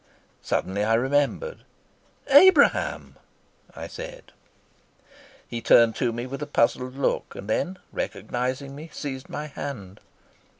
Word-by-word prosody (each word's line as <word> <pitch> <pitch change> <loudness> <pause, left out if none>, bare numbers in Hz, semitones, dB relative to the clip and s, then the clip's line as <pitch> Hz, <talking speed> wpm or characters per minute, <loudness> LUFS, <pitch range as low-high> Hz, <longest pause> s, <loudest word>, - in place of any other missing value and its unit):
Suddenly 100 +2 -1
I 110 +1 +3
remembered. 145 - 0 0.7
"Abraham," 370 +8 +5 0.6
I - - -6
said. - - -9 1.2
He 120 -1 -5
turned 115 -1 +5
to 120 - +1
me 120 +1 -4
with 135 +2 -6
a 150 - -3
puzzled 130 -1 +1
look, 140 - -1
and 100 - -8
then, 185 +12 -1
recognizing 130 +3 -3
me, 155 +3 -9
seized 135 -3 -6
my 150 - -5
hand. 130 -10 -7
135 Hz, 120 wpm, -25 LUFS, 115-150 Hz, 1.2 s, Abraham